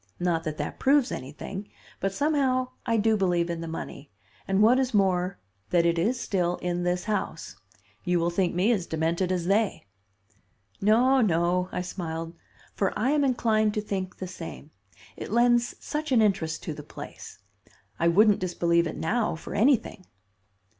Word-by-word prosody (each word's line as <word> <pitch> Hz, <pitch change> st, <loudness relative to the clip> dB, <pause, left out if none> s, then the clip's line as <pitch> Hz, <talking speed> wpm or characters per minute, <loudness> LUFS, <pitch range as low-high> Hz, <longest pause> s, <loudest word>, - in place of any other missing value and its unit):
Not 170 Hz, -2 st, 0 dB
that 155 Hz, -1 st, -3 dB
that 150 Hz, -, -5 dB
proves 275 Hz, -1 st, +3 dB
anything; 170 Hz, +9 st, -6 dB, 0.3 s
but 195 Hz, -, -1 dB
somehow 265 Hz, 0 st, +1 dB, 0.2 s
I 230 Hz, -, +2 dB
do 220 Hz, +1 st, +3 dB
believe 175 Hz, -4 st, +1 dB
in 170 Hz, -1 st, -4 dB
the 165 Hz, -, -5 dB
money, 155 Hz, -3 st, -7 dB, 0.4 s
and, 195 Hz, +2 st, +3 dB
what 245 Hz, +4 st, +5 dB
is 255 Hz, -3 st, 0 dB
more, 185 Hz, -1 st, +2 dB, 0.3 s
that 170 Hz, -1 st, +3 dB
it 170 Hz, 0 st, +2 dB
is 235 Hz, +8 st, +1 dB
still 180 Hz, -3 st, 0 dB
in 175 Hz, 0 st, -2 dB
this 180 Hz, 0 st, 0 dB
house. 215 Hz, -1 st, -3 dB, 0.5 s
You 175 Hz, -1 st, +1 dB
will 170 Hz, +1 st, 0 dB
think 175 Hz, 0 st, 0 dB
me 190 Hz, +6 st, +3 dB
as 190 Hz, -7 st, 0 dB
demented 165 Hz, +3 st, 0 dB
as 180 Hz, -2 st, -1 dB
they." 200 Hz, -, +1 dB, 1.0 s
"No, 245 Hz, +6 st, +4 dB
no," 180 Hz, -2 st, +1 dB
I 180 Hz, -, -2 dB
smiled, 165 Hz, -2 st, -5 dB, 0.4 s
"for 195 Hz, -, -1 dB
I 240 Hz, +6 st, +1 dB
am 295 Hz, -1 st, +2 dB
inclined 220 Hz, -5 st, +2 dB
to 210 Hz, -, 0 dB
think 190 Hz, -3 st, -4 dB
the 185 Hz, -, -5 dB
same; 165 Hz, -4 st, -9 dB, 0.4 s
it -, -, -7 dB
lends 240 Hz, +1 st, +3 dB
such 305 Hz, -1 st, -4 dB
an 250 Hz, -, +5 dB
interest 190 Hz, -7 st, +1 dB
to 160 Hz, -, -4 dB
the 150 Hz, -, -8 dB
place. -, -, -10 dB, 0.6 s
I 170 Hz, -, +3 dB
wouldn't 205 Hz, +4 st, +5 dB
disbelieve 170 Hz, -2 st, +1 dB
it 160 Hz, -, -6 dB
now 215 Hz, +3 st, 0 dB
for 165 Hz, -, -8 dB
anything." 225 Hz, -5 st, +1 dB
185 Hz, 170 wpm, -27 LUFS, 170-225 Hz, 1.0 s, what